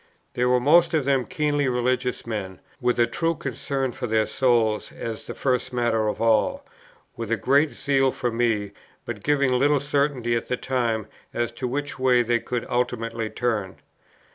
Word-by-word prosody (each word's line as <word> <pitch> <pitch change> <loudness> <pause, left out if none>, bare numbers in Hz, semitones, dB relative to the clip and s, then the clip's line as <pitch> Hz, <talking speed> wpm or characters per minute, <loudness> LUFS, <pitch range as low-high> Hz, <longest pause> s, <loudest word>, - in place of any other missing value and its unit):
They 125 - 0
were 125 0 +4
most 165 +6 +4
of 150 -4 +1
them 135 -3 +1
keenly 145 -2 0
religious 125 0 0
men, 105 -5 -5 0.2
with 125 -2 0
a 120 - +6
true 165 +6 -1
concern 135 -1 -3
for 125 0 -5
their 110 -1 +2
souls 115 -5 +1
as 115 -2 -6
the - - -6
first 130 -1 0
matter 120 -3 +1
of 105 - -2
all, 115 -2 +2 0.5
with 115 -1 -5
a 115 - +2
great 140 +9 +3
zeal 135 -2 +1
for 120 - -2
me, 115 -4 0 0.3
but 115 -4 -5
giving 140 0 +2
little 140 +3 +3
certainty 140 -4 0
at 115 - -2
the 125 - -1
time 115 -5 -1 0.3
as 120 0 -1
to 125 +2 -4
which 140 +2 -3
way 125 -2 +4
they 120 0 0
would 120 -2 -1
ultimately 115 -2 -2
turn. 110 -6 -2
125 Hz, 175 wpm, -24 LUFS, 115-135 Hz, 0.5 s, a